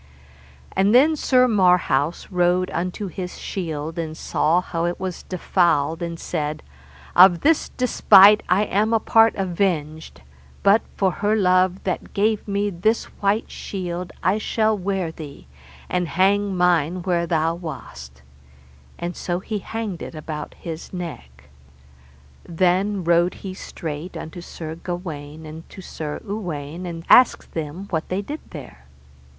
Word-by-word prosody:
And 200 +4 +3
then 300 +5 +6
Sir 255 -3 +3
Marhaus 180 - +2
rode 180 0 +2
unto 180 +4 -3
his 180 -1 -6
shield, 160 -3 -4
and 160 -1 -4
saw 165 +3 +1
how 170 -2 -3
it 175 0 -2
was 185 -2 -4
defouled, 170 -3 +1
and 170 -1 -4
said, 155 -2 -3 0.5
Of 180 -1 +7
this 320 +1 +2
despite 210 -4 +6
I 185 +3 +4
am 215 +2 +1
a 225 - +4
part 225 +1 +4
avenged, 170 - -2 0.4
but 200 +3 +5 0.2
for 190 -2 +2
her 210 +4 0
love 185 -2 +2
that 185 - -4
gave 215 +1 +1
me 200 0 0
this 215 +6 +1 0.2
white 205 +2 0
shield 180 -2 -5
I 200 +3 +2
shall 220 0 +1
wear 190 -3 -2
thee, 150 - -10 0.4
and 180 -1 -1
hang 195 +4 +1
mine 175 0 +2
where 170 -2 0
thou 160 0 +1
wast; 70 - -9 0.7
and 175 +1 -4
so 175 0 -2
he 210 +2 -4
hanged 215 -3 -5
it - - -7
about 155 0 -6
his 165 -1 -8
neck. 145 - -8 1.0
Then 180 +3 +1
he 205 - -3
rode 170 +1 +2 0.2
straight 165 -2 -7
unto 165 +2 -8
Sir 160 -2 -7
Gawaine 160 -3 -7
and 155 +1 -10
to - - -12
Sir 155 -5 -6
Uwaine, 175 -4 -5
and 165 -1 -7
asked 250 -1 +5
them 160 +4 -5
what 160 -3 -2
they 190 +2 -2
did 300 +9 -6
there? 75 - -11
180 Hz, 145 wpm, -22 LUFS, 160-200 Hz, 1.0 s, Of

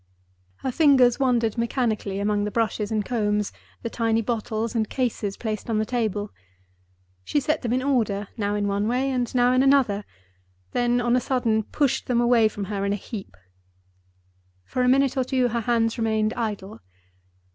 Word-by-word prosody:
Her 260 - -1
fingers 260 -4 +4
wandered 240 -4 +1
mechanically 230 -4 -1
among 205 0 0
the 210 - -1
brushes 215 -1 -1
and 215 -2 0
combs, 210 -3 0 0.3
the 230 - -2
tiny 225 -1 +1
bottles 220 0 -2
and 220 -3 0
cases 225 -6 -2
placed 215 -1 -4
on 225 - +1
the 215 - +1
table. 215 -4 -2 0.9
She 290 - 0
set 300 +3 -1
them 235 - -2
in 255 +1 +1
order, 220 -7 0
now 205 -2 -1
in 205 -1 0
one 200 +1 0
way, 255 +3 0
and 245 -2 -1
now 245 0 +4
in 255 0 +3
another—then 200 - -1
on 240 0 +2
a - - +4
sudden 235 -5 +1
pushed 275 +5 -1
them 245 -2 +2
away 240 -2 +4
from 205 -1 -5
her 200 0 -3
in 200 0 0
a - - 0
heap. 205 - -8 1.3
For 255 - -3
a 250 - +3
minute 275 +1 +3
or 260 - +3
two 255 -1 +1
her 235 0 -1
hands 230 0 +1
remained 220 -1 +1
idle. 205 - -4
225 Hz, 175 wpm, -24 LUFS, 210-250 Hz, 1.3 s, fingers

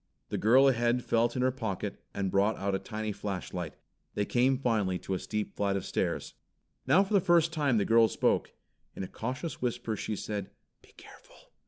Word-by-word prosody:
The - - -2
girl 130 +6 +6
ahead 120 -1 +2
felt 115 +1 +1
in 125 - 0
her 130 - +3
pocket, 110 -7 -4
and 95 -2 -2
brought 100 +3 +2
out 100 0 -1
a 95 - 0
tiny 105 +2 -4
flashlight. 95 -4 -5 0.4
They 105 - 0
came 130 +4 +2
finally 110 -8 0
to 95 - -5
a 95 - -1
steep 105 -1 -4
flight 100 -1 0
of 95 - -3
stairs. - - -2 0.5
Now 190 - +6
for 200 +2 -5
the 200 - +5
first 170 -1 +3
time 145 -7 +2
the 100 - +2
girl 115 0 +5
spoke. - - +1 0.4
In - - -4
a - - -4
cautious 130 - -5
whisper 120 -2 -2
she 105 +1 -3
said, 100 -1 -4 0.3
"Be - - -21
careful!" - - -17
115 Hz, 195 wpm, -30 LUFS, 100-130 Hz, 0.5 s, girl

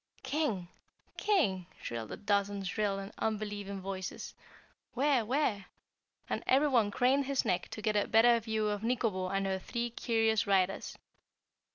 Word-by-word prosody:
"King? 255 - -1 0.5
King?" 200 - +1
shrilled 115 -2 -5
a - - -5
dozen 200 -1 0
shrill 200 +1 -1
and 195 +2 -7
unbelieving 205 -2 -3
voices. 190 -1 -5 0.6
"Where? 270 -2 +3
Where?" 225 -4 0 0.6
and - - -2
everyone 260 -6 +4
craned 260 +6 +2
his 275 -2 0
neck 180 0 0
to 215 - -7
get 215 -1 +1
a 205 - +2
better 235 +1 +5
view 220 -1 -1
of 205 -1 -1
Nikobo 225 -5 0
and 195 0 0
her 190 0 -1
three 235 +4 -3
curious 225 -2 +1
riders. 195 -1 +1
210 Hz, 145 wpm, -32 LUFS, 195-240 Hz, 0.6 s, better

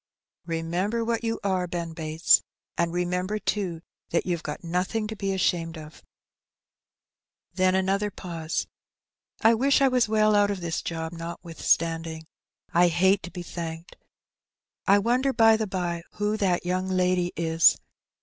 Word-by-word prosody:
Remember 175 +8 -1
what 230 0 -1
you 225 0 -1
are, 185 -2 0
Ben 170 -1 -4
Bates; 160 0 +3 0.3
and 170 0 0
remember, 180 +3 -1
too, 185 -6 -2 0.3
that 170 - 0
you've 175 -3 -1
got 150 +1 -6
nothing 180 +6 -1
to 220 +1 -5
be 195 -1 -2
ashamed 170 -3 0
of." 155 0 -11 1.5
Then 185 0 +2
after - - +3
another 195 +2 0
pause 165 -4 -4 0.4
— - - -28
'^I 225 +1 +6
wish 270 +4 +3
I 275 - +5
was 250 -3 +2
well 215 0 +3
out 205 0 +4
of 200 -2 -2
this 170 -2 -3
job, 160 0 -4
notwithstanding. 165 -1 -2 0.5
I 175 +1 +5
hate 190 +4 +3
to - - -7
be 180 - -6
thanked. 165 -1 -7 0.9
I 200 - +6
wonder, 250 +6 +1
by 225 -2 +6
the 220 -1 -2
bye, 175 -3 -2
who 210 +1 -1
that 185 -5 0
young 185 +1 -1
lady 180 -1 +1
is? 165 -1 +4
180 Hz, 155 wpm, -26 LUFS, 165-205 Hz, 1.5 s, ^I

